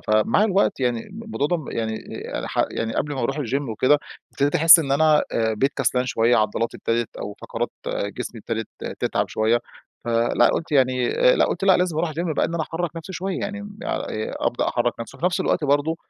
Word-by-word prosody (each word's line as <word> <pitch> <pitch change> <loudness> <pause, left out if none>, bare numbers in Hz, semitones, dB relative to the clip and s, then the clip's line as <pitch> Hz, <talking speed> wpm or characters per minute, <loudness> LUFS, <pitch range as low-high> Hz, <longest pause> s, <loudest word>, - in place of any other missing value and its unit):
فمع 110 - +2
الوقت 200 -5 +1
يعني، 120 -2 +1
الم 215 +4 -10
الموضوع 220 -10 -1
ده 175 - +1
م 155 -5 -8
يعني 110 -1 -2
آآ 110 - -8
يعني - - -3
ح - - +1
يعني 115 0 -3
قبل 150 - -1
ما 135 - -3
أروح 135 +3 -1
الgym 140 0 -2
وكده، 130 +7 +3 0.3
ابتديت 145 +1 0
أحس 165 +3 +9
إن 140 -4 -1
أنا، 155 +1 +4
آآ 110 -1 +1
بقيت 135 +7 +1
كسلان 125 0 +1
شوية، 115 0 +3
عضلاتي 110 +2 0
ابتدت 115 0 -2
أو 105 - -6
فقرات - - -3 0.2
جسمي 105 +3 -4
ابتدت 115 0 -4 0.3
تتعب - - 0
شوية، 110 +2 +1 0.4
فلأ، 115 +1 +3
قلت 165 -1 -2
يعني 130 -3 +3
آآ، - - +4
لأ، - - +4
قلت: - - -2
"لأ 190 -1 +6
لازم 180 -3 0
أروح 165 0 0
الgym 165 +1 -2
بقى." - - +2
إن 170 - -5
أنا 165 - 0
أحرك 165 +1 -4
نفسي 165 +3 -7
شوية 190 +1 -3
يعني، 205 0 -4
م 205 0 -10
آآ 110 - -3
أبدأ - - 0
أحرك - - -1
نفسي. 115 - -8
وفي 175 - 0
نفس 180 0 0
الوقت 165 - 0
برضه 145 +3 +1
140 Hz, 220 wpm, -23 LUFS, 115-170 Hz, 0.4 s, أحس